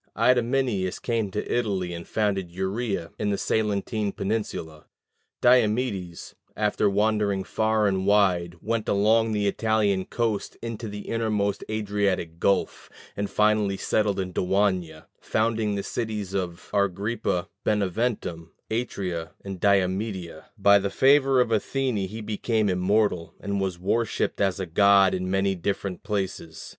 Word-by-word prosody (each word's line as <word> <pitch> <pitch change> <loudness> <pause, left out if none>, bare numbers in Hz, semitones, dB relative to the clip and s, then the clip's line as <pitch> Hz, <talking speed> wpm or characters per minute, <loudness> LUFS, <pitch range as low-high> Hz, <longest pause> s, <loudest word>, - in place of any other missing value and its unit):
Idomeneus 120 -6 +2
came 115 -4 -1
to 105 +2 -4
Italy, 95 -7 -1
and 85 0 -7
founded 100 -4 0
Uria 95 0 -3
in 105 - 0
the 100 - 0
Salentine 105 0 -1
peninsula. 95 -7 -4 0.6
Diomedes, 110 -7 +1 0.2
after 105 -1 +2
wandering 105 -1 +1
far 110 +2 +1
and 95 -1 0
wide, 90 -4 +3
went 115 0 -1
along 110 +3 +3
the 105 -1 0
Italian 105 -2 +1
coast 115 -4 -2
into 115 -1 -5
the 105 0 -6
innermost 105 -3 -1
Adriatic 100 -6 -1
gulf, 100 - 0 0.3
and 100 0 -2
finally 105 -2 +2
settled 105 -1 0
in 90 -1 -3
Daunia, 90 -4 0
founding 110 -1 0
the 100 - -2
cities 105 -5 -4
of 90 -3 -4
Argyrippa, 100 -1 0
Beneventum, 100 -4 -1 0.2
Atria, 95 -8 -3
and 95 -2 -6
Diomedeia: 95 -3 0
by 100 0 +6
the 100 0 -2
favor 135 +2 +4
of 120 -2 +2
Athene 125 +2 0
he 110 +3 -7
became 110 0 0
immortal, 90 -1 +1
and 100 -1 -2
was 95 -2 -2
worshipped 105 +6 -1
as 95 -1 +1
a 95 - -2
god 100 +2 +5
in 90 0 -2
many 95 +1 +1
different 95 0 -3
places. 95 -5 -4
100 Hz, 130 wpm, -25 LUFS, 95-110 Hz, 0.6 s, by